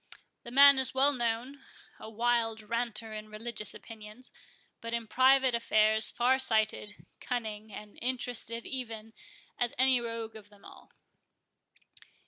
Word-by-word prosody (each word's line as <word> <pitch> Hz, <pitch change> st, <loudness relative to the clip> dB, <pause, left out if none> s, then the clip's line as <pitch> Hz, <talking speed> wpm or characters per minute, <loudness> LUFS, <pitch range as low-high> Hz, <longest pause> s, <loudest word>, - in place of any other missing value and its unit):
The -, -, -11 dB
man 280 Hz, +2 st, +7 dB
is 260 Hz, 0 st, +2 dB
well 275 Hz, +2 st, +4 dB
known—a 240 Hz, -1 st, -6 dB
wild 225 Hz, -1 st, 0 dB
ranter 225 Hz, 0 st, -3 dB
in 215 Hz, 0 st, -8 dB
religious 215 Hz, 0 st, -3 dB
opinions, 220 Hz, +2 st, -10 dB, 0.5 s
but 230 Hz, 0 st, -3 dB
in 230 Hz, -1 st, -4 dB
private 260 Hz, +2 st, +3 dB
affairs 220 Hz, -1 st, +3 dB
far 250 Hz, +2 st, +1 dB
sighted, 220 Hz, -4 st, 0 dB
cunning, 220 Hz, -3 st, -5 dB
and 210 Hz, +1 st, -11 dB
interested 245 Hz, -2 st, -3 dB
even 225 Hz, -4 st, -6 dB, 0.5 s
as 240 Hz, -1 st, -1 dB
any 260 Hz, -1 st, +4 dB
rogue 230 Hz, -1 st, -6 dB
of 210 Hz, -2 st, -13 dB
them 205 Hz, -1 st, -21 dB
all." -, -, -15 dB
230 Hz, 125 wpm, -30 LUFS, 220-250 Hz, 0.5 s, man